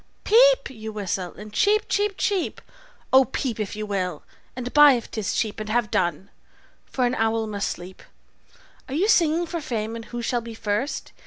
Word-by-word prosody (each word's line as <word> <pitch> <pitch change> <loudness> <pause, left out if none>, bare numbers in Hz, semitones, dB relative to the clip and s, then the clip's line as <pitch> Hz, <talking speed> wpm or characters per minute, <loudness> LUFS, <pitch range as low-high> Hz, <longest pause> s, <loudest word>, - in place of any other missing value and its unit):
`Peep!' - - +5
you 220 -3 -7
whistle, 190 -4 -4
and 210 +2 -11
`cheep! 420 - +3
cheep! 410 -1 0
cheep!' 390 -4 -1 0.5
Oh, 265 0 +8
peep, 245 -2 -3
if 210 -2 -3
you 215 0 -4
will, 185 -6 -3 0.3
and 250 0 -5
buy, 295 -1 +8
if 240 -2 -4
'tis 215 -3 -2
cheap, 215 0 -1
And 215 0 -5
have 230 -1 0
done; 175 +2 -1 0.6
for 255 - 0
an 245 - +1
owl 225 -1 0
must 205 -2 -2
sleep. 180 +2 -8 0.9
Are 265 - -3
ye 370 +7 +2
singing 340 -5 +3
for 335 0 -4
fame, 225 -6 -3
and 230 -1 -7
who 240 +1 -6
shall 240 0 0
be 230 -1 -9
first? 220 +6 -2
230 Hz, 185 wpm, -24 LUFS, 210-295 Hz, 0.9 s, Oh